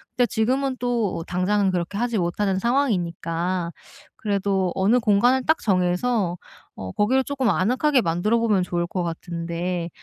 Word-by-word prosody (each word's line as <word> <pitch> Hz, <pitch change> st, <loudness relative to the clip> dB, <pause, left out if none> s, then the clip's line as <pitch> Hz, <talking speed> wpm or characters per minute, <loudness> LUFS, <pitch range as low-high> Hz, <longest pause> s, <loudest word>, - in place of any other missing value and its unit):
근데 245 Hz, -, +3 dB
지금은 255 Hz, +5 st, 0 dB
또 235 Hz, -8 st, -1 dB
당장은 190 Hz, +2 st, +1 dB
그렇게 180 Hz, +2 st, -3 dB
하지 235 Hz, -1 st, 0 dB
못하는 190 Hz, +2 st, 0 dB
상황이니까 180 Hz, -7 st, -1 dB, 0.4 s
그래도 195 Hz, -3 st, 0 dB
어느 205 Hz, +6 st, +3 dB
공간을 245 Hz, +3 st, +3 dB
딱 315 Hz, +1 st, +3 dB
정해서 185 Hz, 0 st, +1 dB, 0.4 s
어 95 Hz, -1 st, -6 dB
거기를 260 Hz, +6 st, +2 dB
쪼끔 265 Hz, -5 st, 0 dB
아늑하게 255 Hz, +9 st, +2 dB
만들어 205 Hz, +5 st, +1 dB
보면 210 Hz, -5 st, +2 dB
좋을 175 Hz, -1 st, -2 dB
것 180 Hz, 0 st, -3 dB
같은데 170 Hz, +1 st, -4 dB
200 Hz, 330 characters per minute, -23 LUFS, 175-240 Hz, 0.4 s, 근데